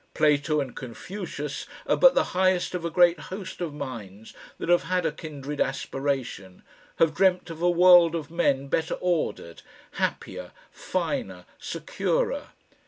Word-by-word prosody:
Plato 150 0 +2
and 135 -4 -4
Confucius 145 - -6 0.2
are - - +2
but - - +6
the - - +4
highest 185 -1 +2
of 180 -2 -3
a 170 - -1
great 175 0 +4
host 190 -1 -7
of 170 -3 -2
minds 115 -8 -8 0.2
that - - -5
have 175 0 +3
had 180 -1 0
a 160 - +1
kindred 150 -2 -6
aspiration, 135 -9 -3 0.3
have 165 -1 +3
dreamt 180 -1 +2
of 165 0 -9
a 175 - +4
world 175 -1 +6
of 160 -2 -5
men 140 -5 +1
better 160 +3 0
ordered, 165 - -2 0.3
happier, - - -3 0.2
finer, 90 -2 -3
securer. - - -2
155 Hz, 145 wpm, -26 LUFS, 135-175 Hz, 0.3 s, but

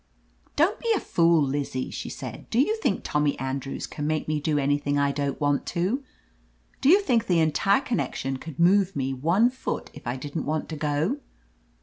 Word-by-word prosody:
"Don't 340 +8 +2
be 465 - 0
a - - 0
fool, 165 -2 +3
Lizzie," 135 -2 -2
she - - -5
said. - - -8
"Do 230 - +1
you 370 +12 +3
think 445 - 0
Tommy 150 -1 0
Andrews 135 +1 -4
can 150 0 -5
make 155 -1 -1
me 155 -1 0
do 150 0 0
anything 145 0 +1
I 140 0 +2
don't 140 -1 -2
want 145 -2 +1
to? 205 +11 0 0.8
Do 270 - +4
you 390 +5 +7
think 235 - +1
the 175 -3 +3
entire 165 - +3
connection 135 - -2
could 150 +1 -9
move 190 +2 +4
me 135 0 -1
one 170 - +3
foot 260 - -4
if - - -11
I 120 - -1
didn't 145 +2 -4
want 155 +1 -2
to 160 - -4
go?" 150 - 0
155 Hz, 195 wpm, -26 LUFS, 140-200 Hz, 0.8 s, you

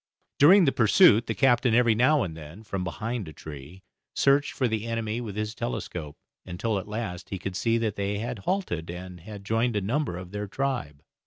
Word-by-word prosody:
During 180 +6 +7
the 135 - +3
pursuit 115 - +5
the - - -2
captain 125 -3 +3
every 120 -2 +4
now 130 +6 +3
and 80 -4 -5
then, 80 +6 -11
from 95 -3 -4
behind 110 +3 -4
a 80 - -9
tree, 80 +6 -10 0.3
searched 140 +1 +3
for 130 - 0
the 110 0 -2
enemy 115 0 -2
with 105 -5 -6
his 105 +1 -3
telescope, 75 - -5 0.3
until 100 +4 -2
at 95 - -9
last 105 -5 -5
he 95 - -3
could 90 +1 -5
see 115 +3 +1
that 110 -3 -2
they 100 +1 -1
had 120 +1 -4
halted, 95 - -2
and 90 +1 -8
had 100 +3 -10
joined 115 +2 +1
a - - +2
number 120 - -1
of 90 0 -9
their 105 0 -4
tribe. 120 - -3
105 Hz, 200 wpm, -26 LUFS, 90-120 Hz, 0.3 s, During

